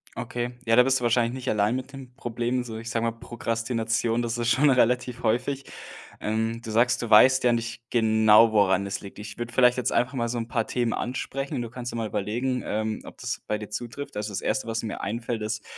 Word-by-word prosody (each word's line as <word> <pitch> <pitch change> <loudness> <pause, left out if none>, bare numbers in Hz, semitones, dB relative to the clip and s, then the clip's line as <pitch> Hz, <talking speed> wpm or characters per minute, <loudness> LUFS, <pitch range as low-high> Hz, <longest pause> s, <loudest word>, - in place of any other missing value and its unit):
Okay, 120 0 -4
ja, 115 0 +4
da 125 - +8
bist 130 0 +2
du - - -7
wahrscheinlich 120 0 +2
nicht 130 0 -4
allein 105 +3 +2
mit 130 +2 -5
dem 130 -2 -10
Problem, 120 0 -2
so 110 -2 -7
ich 115 +1 -7
sag 115 0 -1
mal: 115 - +1
„Prokrastination, 115 0 -2
das 115 0 -2
ist 120 0 +1
schon 145 +2 +4
relativ 125 0 +2
häufig“. 130 +5 0 0.5
Ähm, 110 +2 -1
du 110 - -6
sagst: 120 +3 +3
„Du 115 - -4
weißt 130 +5 +7
ja 120 -1 +4
nicht 115 0 -3
genau, 110 -1 +5
woran 100 -2 +3
es 100 - -3
liegt“. 100 0 -11
Ich 105 0 -8
würde 120 0 -5
vielleicht 125 -1 +5
jetzt 125 - 0
einfach 125 +3 +1
mal 120 -1 0
so 120 +1 -3
'n 115 - -4
paar 115 -1 -1
Themen 120 -2 0
ansprechen, 135 +1 -3
du 115 - -5
kannst 125 0 -6
dir - - -5
mal 115 -1 -2
überlegen, 120 +6 -2
ähm, 110 0 -2
ob - - -11
das - - -4
bei 105 - 0
dir 105 - -8
zutrifft. 120 +3 -6
Also, 105 +1 -3
das 95 - -3
1., 135 - -1
was 115 0 -2
mir 110 - -4
einfällt 115 +1 -3
ist: 110 0 -3
115 Hz, 230 wpm, -26 LUFS, 110-125 Hz, 0.5 s, da